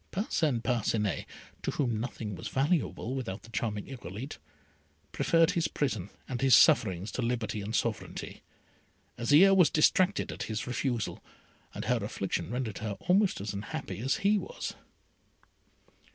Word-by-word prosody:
Parcin 155 Hz, -, 0 dB
Parcinet, 110 Hz, -5 st, 0 dB, 0.3 s
to -, -, -2 dB
whom 120 Hz, -6 st, 0 dB
nothing 110 Hz, -3 st, -4 dB
was 90 Hz, -, -6 dB
valuable 135 Hz, -3 st, 0 dB
without 115 Hz, -7 st, -4 dB
the 115 Hz, -, -14 dB
charming 105 Hz, -3 st, -2 dB
Irolite, 125 Hz, -1 st, -7 dB, 0.7 s
preferred 165 Hz, -1 st, +3 dB
his 170 Hz, -1 st, +1 dB
prison 110 Hz, -10 st, -2 dB, 0.2 s
and 125 Hz, -2 st, -4 dB
his 135 Hz, -3 st, +7 dB
sufferings 105 Hz, -, +4 dB
to 130 Hz, -, -3 dB
liberty 115 Hz, -3 st, -1 dB
and 105 Hz, +3 st, -3 dB
sovereignty. 110 Hz, -1 st, -3 dB, 0.8 s
Azire 155 Hz, +11 st, +6 dB
was 180 Hz, -6 st, +6 dB
distracted 185 Hz, +5 st, +3 dB
at -, -, -7 dB
his 110 Hz, -1 st, -2 dB
refusal, 120 Hz, -2 st, -2 dB, 0.5 s
and -, -, -4 dB
her -, -, +2 dB
affliction -, -, -3 dB
rendered 120 Hz, -3 st, -3 dB
her 105 Hz, -2 st, -4 dB
almost 190 Hz, +2 st, +3 dB
as 100 Hz, 0 st, -4 dB
unhappy 100 Hz, 0 st, -5 dB
as 135 Hz, +4 st, +1 dB
he 205 Hz, +1 st, +5 dB
was. -, -, -5 dB
120 Hz, 140 wpm, -30 LUFS, 110-150 Hz, 0.8 s, his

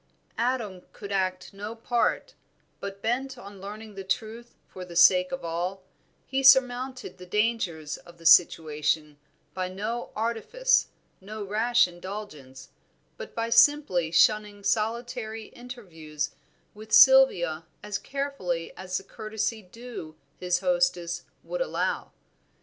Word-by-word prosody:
Adam 230 Hz, -6 st, -1 dB
could 200 Hz, -1 st, -9 dB
act 185 Hz, 0 st, -1 dB
no 205 Hz, +3 st, -6 dB
part, 235 Hz, +1 st, 0 dB, 0.5 s
but 200 Hz, 0 st, -7 dB
bent 255 Hz, +3 st, -1 dB
on 200 Hz, -4 st, -11 dB
learning 210 Hz, +2 st, -8 dB
the 195 Hz, -1 st, -7 dB
truth 225 Hz, +4 st, -4 dB
for 185 Hz, -, -9 dB
the 175 Hz, -1 st, -10 dB
sake 180 Hz, +1 st, +6 dB
of 265 Hz, -, -5 dB
all, 180 Hz, +3 st, -3 dB, 0.4 s
he 270 Hz, 0 st, -1 dB
surmounted 255 Hz, -5 st, +3 dB
the 180 Hz, -, -10 dB
dangers 185 Hz, -7 st, -1 dB
of 175 Hz, 0 st, -16 dB
the 165 Hz, -, -17 dB
situation 155 Hz, -2 st, +3 dB, 0.3 s
by 185 Hz, -1 st, -3 dB
no 215 Hz, +6 st, -4 dB
artifice, 235 Hz, -, +1 dB, 0.3 s
no 210 Hz, +2 st, -7 dB
rash 220 Hz, +3 st, +3 dB
indulgence, 175 Hz, -8 st, -9 dB, 0.5 s
but 485 Hz, -, -10 dB
by 230 Hz, 0 st, -2 dB
simply 230 Hz, -, +4 dB
shunning 205 Hz, +3 st, +3 dB
solitary 225 Hz, 0 st, -2 dB
interviews 165 Hz, -, -6 dB, 0.4 s
with 215 Hz, +1 st, -12 dB
Sylvia 175 Hz, -14 st, +6 dB, 0.2 s
as 210 Hz, -1 st, -3 dB
carefully 270 Hz, -12 st, -4 dB
as 185 Hz, -1 st, -4 dB
the -, -, -7 dB
courtesy 220 Hz, +2 st, -4 dB
due 205 Hz, -5 st, -10 dB, 0.2 s
his 180 Hz, -1 st, 0 dB
hostess 265 Hz, -11 st, 0 dB, 0.2 s
would -, -, -4 dB
allow. -, -, -2 dB
210 Hz, 125 wpm, -27 LUFS, 180-240 Hz, 0.5 s, sake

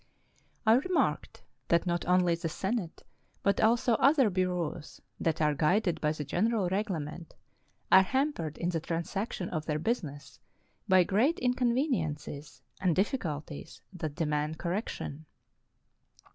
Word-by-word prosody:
I 220 Hz, -, +6 dB
re 270 Hz, +10 st, +2 dB
marked 365 Hz, -, 0 dB, 0.2 s
that 170 Hz, +1 st, +3 dB
not 175 Hz, -2 st, -1 dB
only 180 Hz, -1 st, +4 dB
the 165 Hz, 0 st, -2 dB
Senate, 190 Hz, 0 st, -3 dB, 0.4 s
but 200 Hz, -, +2 dB
also 230 Hz, +2 st, +3 dB
other 275 Hz, -6 st, +5 dB
bureaus 180 Hz, -4 st, -2 dB, 0.2 s
that 165 Hz, -1 st, 0 dB
are 150 Hz, 0 st, +3 dB
guided 175 Hz, +5 st, +1 dB
by 150 Hz, -, +2 dB
the 150 Hz, -1 st, -4 dB
General 205 Hz, -, +1 dB
Reglement, 175 Hz, -5 st, -3 dB, 0.6 s
are 190 Hz, -, +9 dB
ham 270 Hz, +9 st, +1 dB
pered 155 Hz, -, -5 dB
in 175 Hz, -, -1 dB
the 170 Hz, -2 st, -1 dB
transaction 175 Hz, +4 st, -3 dB
of 155 Hz, -2 st, -4 dB
their 150 Hz, -2 st, 0 dB
business 155 Hz, -, -3 dB, 0.5 s
by 185 Hz, -2 st, +6 dB
great 230 Hz, -, +2 dB
incon 250 Hz, -1 st, +1 dB
veniences 155 Hz, -, -2 dB, 0.2 s
and 180 Hz, -4 st, +2 dB
difficulties 165 Hz, -, -3 dB
that 155 Hz, -5 st, -5 dB
demand 150 Hz, 0 st, -1 dB
correction. 170 Hz, -5 st, -4 dB
180 Hz, 135 wpm, -30 LUFS, 155-220 Hz, 0.6 s, are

